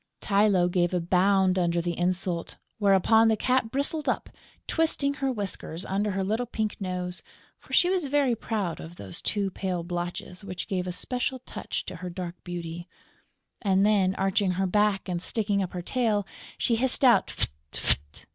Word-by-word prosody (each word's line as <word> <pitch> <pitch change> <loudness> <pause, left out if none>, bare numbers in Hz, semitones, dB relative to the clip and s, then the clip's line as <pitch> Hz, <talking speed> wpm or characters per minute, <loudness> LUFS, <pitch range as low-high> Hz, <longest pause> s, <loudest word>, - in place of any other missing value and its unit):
Tylô 200 -3 +3
gave 175 0 +1
a - - +2
bound 185 +2 +3
under 170 -1 +1
the 170 0 -2
insult, 180 -1 -1 0.2
whereupon 205 +3 +5
the 220 -1 +3
Cat 250 0 +1
bristled 285 +4 -1
up, - - -1 0.4
twisting 310 -3 +1
her 270 -2 -1
whiskers 195 -5 -4
under 200 +2 0
her 195 -1 -1
little 220 +5 -1
pink 215 -2 -2
nose 180 -1 -3 0.4
(for - - -18
she 355 - +6
was 365 -5 +1
very 275 -3 +2
proud 205 -6 -3
of 165 +2 -9
those 95 - -7
two 200 -2 -1
pale 180 -2 -3
blotches 175 +2 -5
which 185 -3 -5
gave 185 -2 -2
a - - -1
special 250 +7 -2
touch - - -4
to 185 - -6
her 180 +2 -6
dark 175 -1 -5
beauty); 175 -1 -6 0.7
and 195 -2 +3
then, 195 -3 +3
arching 195 0 +1
her 190 +2 0
back 205 +1 +2
and 175 -2 -2
sticking 205 -1 +2
up 185 - -3
her 180 -1 -4
tail, 215 -3 +1 0.3
she 230 - +1
hissed 260 +2 +2
out, 245 - +6
"Fft! - - 0 0.2
Fft!" 70 +2 0
195 Hz, 175 wpm, -27 LUFS, 180-220 Hz, 0.7 s, she